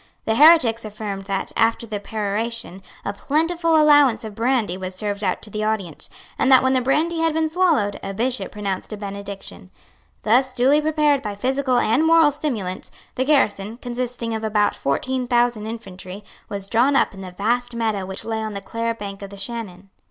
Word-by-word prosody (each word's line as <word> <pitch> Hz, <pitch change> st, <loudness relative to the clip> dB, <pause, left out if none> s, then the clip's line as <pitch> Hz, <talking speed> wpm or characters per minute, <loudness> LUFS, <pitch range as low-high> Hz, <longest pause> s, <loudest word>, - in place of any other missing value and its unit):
The 220 Hz, -, +1 dB
heretics 255 Hz, -5 st, +6 dB
affirmed 210 Hz, -2 st, -6 dB
that, 195 Hz, -1 st, -3 dB
after 230 Hz, +1 st, +2 dB
the 210 Hz, -2 st, -4 dB
peroration, 215 Hz, -1 st, -3 dB, 0.2 s
a 200 Hz, -, -2 dB
plentiful 325 Hz, -, +1 dB
allowance 290 Hz, -7 st, +5 dB
of 220 Hz, -2 st, -7 dB
brandy 230 Hz, -4 st, 0 dB
was 185 Hz, 0 st, -6 dB
served 205 Hz, +1 st, -3 dB
out 185 Hz, -2 st, -1 dB
to 210 Hz, -, -10 dB
the 215 Hz, +1 st, -3 dB
audience, 205 Hz, -7 st, -3 dB, 0.3 s
and 270 Hz, -, +3 dB
that, 260 Hz, -1 st, +7 dB
when 260 Hz, 0 st, +3 dB
the 255 Hz, -, +2 dB
brandy 315 Hz, +6 st, +1 dB
had 325 Hz, -1 st, +1 dB
been 320 Hz, 0 st, +1 dB
swallowed, 315 Hz, -, +1 dB
a 195 Hz, -, -5 dB
Bishop 245 Hz, +5 st, -2 dB
pronounced 200 Hz, -2 st, -4 dB
a 215 Hz, -, -5 dB
benediction. 200 Hz, -2 st, -7 dB, 0.5 s
Thus 255 Hz, +4 st, +3 dB
duly 270 Hz, +5 st, +3 dB
prepared 300 Hz, -2 st, +2 dB
by 210 Hz, -4 st, -5 dB
physical 260 Hz, +3 st, 0 dB
and 240 Hz, +5 st, +2 dB
moral 325 Hz, -2 st, +5 dB
stimulants, 235 Hz, -11 st, -3 dB, 0.2 s
the 260 Hz, -, -1 dB
garrison, 225 Hz, -7 st, +1 dB
consisting 245 Hz, -1 st, -4 dB
of 220 Hz, 0 st, -3 dB
about 210 Hz, -1 st, +2 dB
fourteen 255 Hz, -, -2 dB
thousand 240 Hz, -3 st, +1 dB
infantry, 195 Hz, -3 st, -8 dB, 0.3 s
was 200 Hz, -1 st, -1 dB
drawn 240 Hz, +7 st, +2 dB
up -, -, +2 dB
in 195 Hz, -, -10 dB
the 185 Hz, -, -7 dB
vast 235 Hz, +6 st, -1 dB
meadow 220 Hz, -4 st, -1 dB
which 190 Hz, +1 st, -6 dB
lay 225 Hz, -1 st, -2 dB
on 215 Hz, -1 st, -4 dB
the -, -, -3 dB
Clare 230 Hz, +3 st, -3 dB
bank 200 Hz, -2 st, -7 dB
of 200 Hz, -, -7 dB
the 200 Hz, -, -11 dB
Shannon. 195 Hz, -3 st, -5 dB
225 Hz, 190 wpm, -22 LUFS, 200-260 Hz, 0.5 s, that